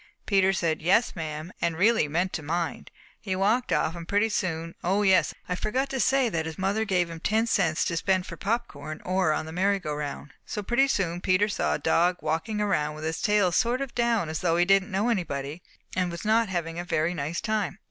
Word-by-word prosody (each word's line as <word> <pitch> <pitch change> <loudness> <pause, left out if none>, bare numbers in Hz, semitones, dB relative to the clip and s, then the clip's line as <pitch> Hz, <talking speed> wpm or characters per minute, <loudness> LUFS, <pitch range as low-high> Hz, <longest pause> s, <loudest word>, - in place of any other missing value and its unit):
"Peter 195 -2 +3
said 170 -4 -1
'yes, 195 +8 +3
ma'am,' 155 0 -5
and 165 -1 0
really 220 -2 +3
meant 175 +5 -1
to 160 - -3
mind. 165 +3 -3 0.3
He 190 -3 -3
walked 215 +6 +1
off 160 - +1
and 170 -1 -8
pretty 205 +2 +2
soon 165 -5 -2
oh, 195 +4 +2
yes, 190 -2 +4 0.2
I 180 - -1
forgot 250 +9 -1
to 265 - -2
say 265 0 +3
that 165 -7 -2
his 160 - -6
mother 200 +4 0
gave 180 -4 +1
him 165 -1 -8
ten 220 +6 +1
cents 180 -9 +1
to 170 - -1
spend 185 +2 +1
for - - -7
popcorn 155 -9 -4
or 185 -2 +2
on 155 - -1
the 160 - -7
merry 195 +4 +2
go 155 -6 -4
round. 145 0 -5
So 210 - -5
pretty 240 +6 +3
soon 175 -8 -1
Peter 185 +3 +3
saw 205 - 0
a - - -1
dog 175 +4 +2
walking 165 +8 -2
around 155 -8 0
with 155 - -8
his 160 0 -2
tail 210 -4 +3
sort 240 +7 +1
of 275 -2 -4
down 235 -6 +1
as 155 0 -3
though 170 -2 +1
he 175 - +4
didn't 195 +1 +3
know 200 +4 0
anybody 155 - -2 0.3
and 185 -1 +1
was 170 +3 -7
not 220 0 +3
having 170 -2 -3
a - - -3
very 165 0 0
nice 155 +1 -3
time. 215 -3 -1
185 Hz, 225 wpm, -26 LUFS, 165-210 Hz, 0.3 s, yes